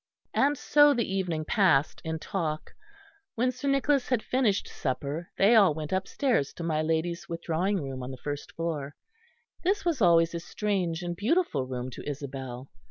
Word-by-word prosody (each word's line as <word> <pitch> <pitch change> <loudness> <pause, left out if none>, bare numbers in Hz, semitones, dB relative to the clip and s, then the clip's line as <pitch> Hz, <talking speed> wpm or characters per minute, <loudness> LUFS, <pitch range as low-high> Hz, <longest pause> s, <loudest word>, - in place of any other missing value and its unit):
And 285 +2 +3
so 290 +1 +5
the 235 -2 +1
evening 180 -5 -2
passed 160 -7 +2
in 160 0 -2
talk. 155 -2 -3 0.6
When 250 +2 +2
Sir 255 +3 -5
Nicholas 275 -1 +2
had 250 -4 +1
finished 240 -6 +1
supper, 145 +5 -3
they 205 +4 +5
all 200 -9 +6
went 155 -1 -5
upstairs 190 - 0
to 170 - -7
my 155 -2 0
lady's 165 +3 -1
withdrawing 170 +4 -1
room 135 -1 -5
on 125 - -5
the 130 - -7
first 145 +2 -6
floor. 150 -4 -3 0.7
This 390 +3 +1
was 325 -8 0
always 170 -2 +5
a 170 - -2
strange 180 -2 -2
and 175 0 -3
beautiful 205 - +1
room 130 0 -4
to 135 - -7
Isabel. 135 -2 -6
170 Hz, 165 wpm, -28 LUFS, 150-220 Hz, 0.7 s, all